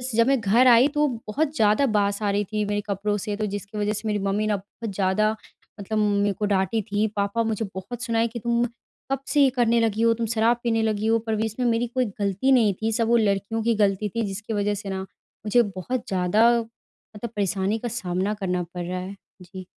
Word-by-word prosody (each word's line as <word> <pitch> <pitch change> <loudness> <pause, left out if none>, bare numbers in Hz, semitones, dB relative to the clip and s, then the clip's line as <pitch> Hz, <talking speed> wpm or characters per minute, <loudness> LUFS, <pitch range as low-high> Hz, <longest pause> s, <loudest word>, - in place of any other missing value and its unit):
जब 230 +1 +4
मैं 270 -1 +3
घर 230 +5 +4
आई 240 +2 +7
तो 295 0 +1 0.2
बहुत 290 +7 -1
ज़्यादा 215 +3 +3
बास 200 0 +1
आ 205 - +1
रही 205 +1 +1
थी 210 0 +1
मेरे 205 0 -1
कपड़ों 205 +1 -1
से 205 +1 -3
तो 215 - -1
जिसकी 205 +1 -6
वजह 210 0 0
से 215 +1 -4
मेरी 210 -1 0
मम्मी 200 +2 0
ना 210 - +1
बहुत 205 +2 -8
ज़्यादा 195 +2 +2 0.5
मतलब 205 +2 -3
मेरे 205 -1 +2
को 210 - +1
डाँटी 205 +2 +1
थी 210 +2 +2
पापा 200 +3 0
मुझे 225 0 -1
बहुत 235 +6 -6
सुनाए 230 -1 +1
कि 235 +1 -7
तुम 235 +1 +1 0.5
कब 270 - +1
से 295 - +3
ये 270 - +5
करने 235 -1 +3
लगी 225 -1 0
हो? 230 0 +4
तुम 230 0 -2
शराब 230 +2 +2
पीने 225 -2 +1
लगी 215 -1 0
हो 225 0 +3
पर 220 - +1
भी 220 +1 0
इसमें 225 +3 -3
मेरी 235 +1 +1
कोई 255 +2 0
गलती 200 +6 +1
नहीं 225 -6 +4
थी 220 +1 0
सब 225 +1 +1
वो 235 +1 +4
लड़कियों 210 +1 0
की 230 0 +2
गलती 200 +1 0
थी 230 - 0
जिसकी 210 +3 -5
वजह 205 0 0
से 200 - -5
ना 190 0 -3
मुझे 210 +4 -2
बहुत 245 +6 -4
ज़्यादा 195 +4 +3
मतलब 230 0 -12
परेशानी 200 +1 0
का 240 - -4
सामना 195 -3 -2
करना 180 -4 -2
पड़ 175 -1 -4
रहा 180 +1 -3
है। 190 +2 -7 0.3
जी। 185 +1 -10
215 Hz, 225 wpm, -24 LUFS, 200-230 Hz, 0.5 s, आई